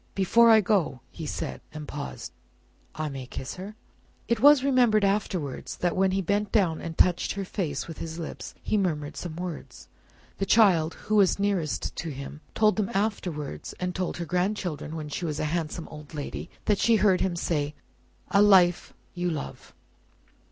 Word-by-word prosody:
"Before 230 +5 +5
I 220 -1 +7
go," 180 - +1
he - - -7
said, 65 -1 -4
and 155 -1 -8
paused 145 -1 -6 0.6
"I 155 0 -2
may 135 -3 -6
kiss 130 - -6
her?" 200 +4 -8 0.5
It 235 -1 +1
was 285 +1 +7
remembered 245 -6 +4
afterwards 190 -8 -2
that 175 -1 0
when 190 0 +3
he 190 +1 0
bent 205 +2 0
down 180 -7 +2
and 165 -1 -6
touched 180 -1 +3
her 195 -1 -4
face 160 -7 -3
with 165 - -8
his 160 0 -5
lips, 165 -2 -7
he 215 - +1
murmured 150 -6 -2
some 170 -3 -6
words. 175 -2 -7 0.5
The 195 - -1
child, 180 -8 +4
who 215 - +2
was 195 -3 +4
nearest 200 -6 -1
to 165 - -3
him, 140 +1 -7
told 215 -1 +3
them 210 -3 0
afterwards, 185 -8 -2
and 180 0 -2
told 185 0 -3
her 170 - -3
grandchildren 180 -3 -2
when 155 -2 -5
she 150 +4 -5
was 150 -3 -2
a - - 0
handsome 165 0 -3
old 150 0 -11
lady, 145 -1 -5 0.2
that 205 -2 +2
she 230 - +4
heard 200 -4 +3
him 185 -2 0
say, 150 -3 -1 0.6
"A 200 - +5
life 185 -4 +5 0.2
you 175 0 -1
love." 155 -4 -6
180 Hz, 180 wpm, -27 LUFS, 155-205 Hz, 0.6 s, I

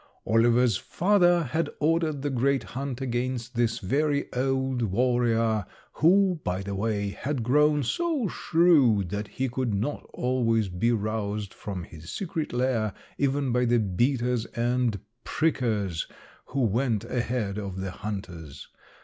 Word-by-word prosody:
"Oliver's 115 -1 +3
father 175 - +3
had 155 +3 -1
ordered 155 -2 +1
the 145 - -1
great 135 +2 +1
hunt 135 0 -5
against 125 -1 -2
this 115 -1 +1
very 145 +8 0
old 130 0 0
warrior, 115 0 +1 0.3
who, 180 +1 +3
by 90 +1 -2
the 100 +1 -4
way, 100 0 -1
had 130 +4 -3
grown 150 +4 +3
so 310 - 0
shrewd 145 - +3
that 105 +3 -3
he 130 +5 -2
could 125 -3 -1
not 115 +9 -2
always 115 -4 +1
be 90 +7 +1
roused 105 -2 -2
from 95 -4 -6
his 80 -1 -11
secret 165 -5 -3
lair 120 -4 0 0.2
even 140 -1 +1
by 125 +1 +2
the 120 0 +3
beaters 120 +3 +1
and 120 -2 0 0.2
prickers 110 - 0 0.4
who 140 - -2
went 115 0 +1
ahead 120 -4 -2
of 95 -2 -5
the 95 0 -3
hunters. 90 -8 -7
120 Hz, 135 wpm, -27 LUFS, 105-140 Hz, 0.4 s, Oliver's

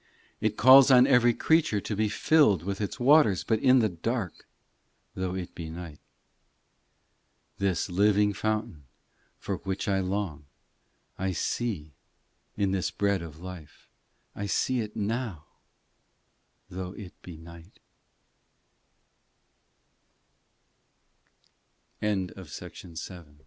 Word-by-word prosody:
IX 110 -1 +1
It - - -26
calls 130 +3 +8
on 125 -1 +7
every 125 -3 +5
creature 155 -8 +2
to 105 - -4
be 110 +1 0
filled 105 - +3
With 100 +2 -4
its 100 +5 -4
waters, 125 - +4
but 110 -2 0
in 130 +1 +5
the 110 -4 +3
dark, 100 +2 -4 0.7
Though 95 -1 -3
it 90 -2 -6
be 80 -2 -7
night. 80 -2 -9
x - - -44
This 95 -4 0
living 105 +2 +3
fountain 110 - -3 0.5
for - - -4
which 95 0 -4
I 95 -1 +1
long 95 -6 -3 0.7
I 95 0 -1
see 90 -9 -3 0.6
in 100 -2 +1
this 95 -2 -1
Bread 100 -3 0
of 80 -1 -10
life, 90 -5 -11 0.4
I 100 - -4
see 130 +5 0
it 105 -2 -5
now, 105 -6 -3 1.2
Tho 95 0 -7
100 Hz, 100 wpm, -27 LUFS, 90-115 Hz, 1.2 s, calls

